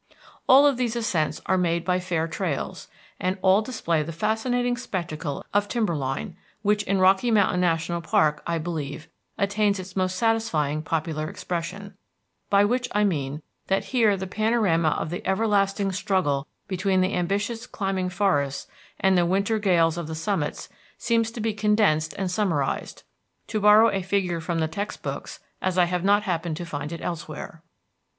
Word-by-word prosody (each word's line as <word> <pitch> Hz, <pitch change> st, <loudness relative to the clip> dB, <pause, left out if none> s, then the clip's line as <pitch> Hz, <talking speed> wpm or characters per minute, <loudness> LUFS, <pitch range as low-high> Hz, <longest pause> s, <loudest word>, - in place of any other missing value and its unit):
All 270 Hz, +3 st, +8 dB
of 280 Hz, -3 st, +3 dB
these 245 Hz, -2 st, -1 dB
ascents 180 Hz, -10 st, -1 dB
are 185 Hz, 0 st, +2 dB
made 170 Hz, -1 st, 0 dB
by 180 Hz, 0 st, +2 dB
fair 170 Hz, -3 st, -1 dB
trails, 165 Hz, -4 st, -3 dB, 0.3 s
and 185 Hz, +2 st, -1 dB
all 190 Hz, +2 st, +5 dB
display 190 Hz, -9 st, -1 dB
the 155 Hz, +2 st, -4 dB
fascinating 245 Hz, +7 st, 0 dB
spectacle 170 Hz, -, -4 dB
of 205 Hz, 0 st, +2 dB
timber 215 Hz, -7 st, 0 dB
line, 140 Hz, +6 st, -3 dB, 0.3 s
which 205 Hz, 0 st, +2 dB
in 195 Hz, +1 st, +1 dB
Rocky 190 Hz, +5 st, +4 dB
Mountain 200 Hz, -5 st, +3 dB
National 170 Hz, 0 st, 0 dB
Park, 155 Hz, -2 st, +2 dB
I 170 Hz, 0 st, 0 dB
believe, 155 Hz, -2 st, -5 dB, 0.3 s
attains 205 Hz, 0 st, +1 dB
its 185 Hz, 0 st, -8 dB
most 185 Hz, -1 st, 0 dB
satisfying 180 Hz, -9 st, +1 dB
popular 155 Hz, -1 st, -2 dB
expression; 180 Hz, +4 st, -5 dB, 0.6 s
by 200 Hz, 0 st, +5 dB
which 250 Hz, +3 st, 0 dB
I 210 Hz, -, +3 dB
mean 150 Hz, -6 st, -1 dB, 0.2 s
that 195 Hz, 0 st, +1 dB
here 220 Hz, -5 st, +4 dB
the 190 Hz, -, -4 dB
panorama 200 Hz, -5 st, +2 dB
of 155 Hz, -, -2 dB
the 175 Hz, -, -4 dB
everlasting 200 Hz, -1 st, +1 dB
struggle 180 Hz, -7 st, 0 dB, 0.2 s
between 190 Hz, 0 st, +1 dB
the 185 Hz, +2 st, +1 dB
ambitious 205 Hz, +7 st, -1 dB
climbing 195 Hz, -2 st, -2 dB
forests 145 Hz, -8 st, 0 dB, 0.3 s
and 190 Hz, 0 st, +3 dB
the 175 Hz, -, +4 dB
winter 200 Hz, +4 st, +1 dB
gales 170 Hz, -5 st, +2 dB
of 170 Hz, -, -5 dB
the 160 Hz, -, -5 dB
summits 165 Hz, -3 st, -2 dB, 0.3 s
seems 230 Hz, -1 st, +1 dB
to 230 Hz, -, -8 dB
be 220 Hz, 0 st, 0 dB
condensed 210 Hz, -7 st, +2 dB
and 190 Hz, -2 st, -2 dB
summarized, 170 Hz, -9 st, -1 dB, 0.4 s
to 215 Hz, -, -2 dB
borrow 210 Hz, +2 st, +7 dB
a 195 Hz, -, -1 dB
figure 180 Hz, -2 st, -1 dB
from 165 Hz, +1 st, -2 dB
the 160 Hz, -1 st, +1 dB
textbooks, 200 Hz, +6 st, -5 dB, 0.2 s
as 185 Hz, -1 st, -1 dB
I 180 Hz, -, +5 dB
have 180 Hz, 0 st, -2 dB
not 205 Hz, +1 st, +4 dB
happened 170 Hz, -5 st, -2 dB
to 175 Hz, -, -5 dB
find 150 Hz, -2 st, -5 dB
it 170 Hz, -, -6 dB
elsewhere. 160 Hz, -1 st, -6 dB
185 Hz, 165 wpm, -25 LUFS, 165-210 Hz, 0.6 s, All